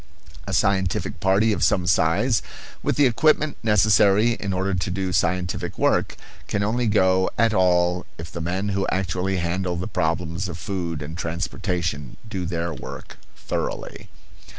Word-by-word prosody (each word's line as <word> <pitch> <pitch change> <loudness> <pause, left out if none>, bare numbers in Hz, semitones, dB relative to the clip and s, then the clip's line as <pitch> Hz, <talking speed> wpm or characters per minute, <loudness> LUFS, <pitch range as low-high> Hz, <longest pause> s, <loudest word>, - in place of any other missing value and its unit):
A - - -3
scientific 95 -2 0
party 105 +4 +3
of - - -1
some 90 - +2
size, 90 +7 +2 0.4
with - - 0
the 145 - +4
equipment 155 +4 +3
necessary 105 0 +4
in 105 -3 -3
order 95 +1 -1
to 90 +1 -1
do 95 0 -2
scientific 90 +1 -1
work, - - +1 0.3
can 100 -1 -1
only 115 +3 0
go 95 -3 +3
at 115 -1 +3
all 90 -1 +2
if 80 0 -8
the 85 - -5
men 95 +5 -2
who 100 0 0
actually 95 0 -1
handle 90 +1 -1
the 90 +2 -3
problems 90 -1 -1
of 80 - -6
food 85 -3 -4
and 80 +3 -7
transportation 85 - -3
do 95 -5 -4
their 85 -1 -2
work 65 - -9 0.2
thoroughly. - - -5
95 Hz, 150 wpm, -23 LUFS, 85-100 Hz, 0.4 s, the